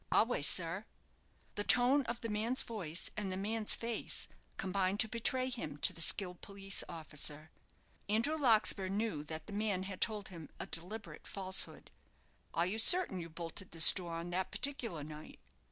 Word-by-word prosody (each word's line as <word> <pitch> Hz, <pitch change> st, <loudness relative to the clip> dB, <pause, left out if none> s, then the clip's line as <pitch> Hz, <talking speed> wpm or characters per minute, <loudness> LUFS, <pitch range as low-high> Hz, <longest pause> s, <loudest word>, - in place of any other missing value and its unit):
"A -, -, +6 dB
ways, 225 Hz, -11 st, +2 dB
sir." 180 Hz, +4 st, +2 dB, 0.7 s
The 205 Hz, -, -1 dB
tone 250 Hz, +5 st, +5 dB
of 235 Hz, 0 st, -4 dB
the 230 Hz, -, -3 dB
man's 225 Hz, +4 st, 0 dB
voice 175 Hz, -8 st, -4 dB
and 200 Hz, -3 st, -3 dB
the 185 Hz, -, -3 dB
man's 215 Hz, +2 st, -1 dB
face 230 Hz, -1 st, -4 dB, 0.3 s
combined 190 Hz, +1 st, 0 dB
to 220 Hz, -, 0 dB
betray 250 Hz, +3 st, 0 dB
him 230 Hz, -, -5 dB
to -, -, +4 dB
the 165 Hz, -, -5 dB
skilled 180 Hz, +1 st, +1 dB
police 195 Hz, 0 st, 0 dB
officer. 155 Hz, -2 st, -3 dB, 0.6 s
Andrew 230 Hz, +9 st, +2 dB
Larkspur 220 Hz, -8 st, +4 dB
knew 195 Hz, -6 st, -2 dB
that 155 Hz, +1 st, -5 dB
the -, -, -9 dB
man 205 Hz, -3 st, 0 dB
had 190 Hz, -1 st, -7 dB
told 210 Hz, -3 st, +2 dB
him 165 Hz, -5 st, -10 dB
a -, -, -3 dB
deliberate 205 Hz, +7 st, -6 dB
falsehood. 190 Hz, -1 st, -1 dB, 0.6 s
"Are 170 Hz, -, +1 dB
you 205 Hz, +5 st, -1 dB
certain 290 Hz, -, +5 dB
you 170 Hz, -1 st, -7 dB
bolted 170 Hz, +3 st, -7 dB
this 165 Hz, -1 st, +7 dB
door 175 Hz, -3 st, -4 dB
on 170 Hz, +1 st, -5 dB
that 185 Hz, +1 st, -1 dB
particular 245 Hz, -, -1 dB
night?" 155 Hz, +1 st, -10 dB
195 Hz, 170 wpm, -35 LUFS, 170-225 Hz, 0.7 s, this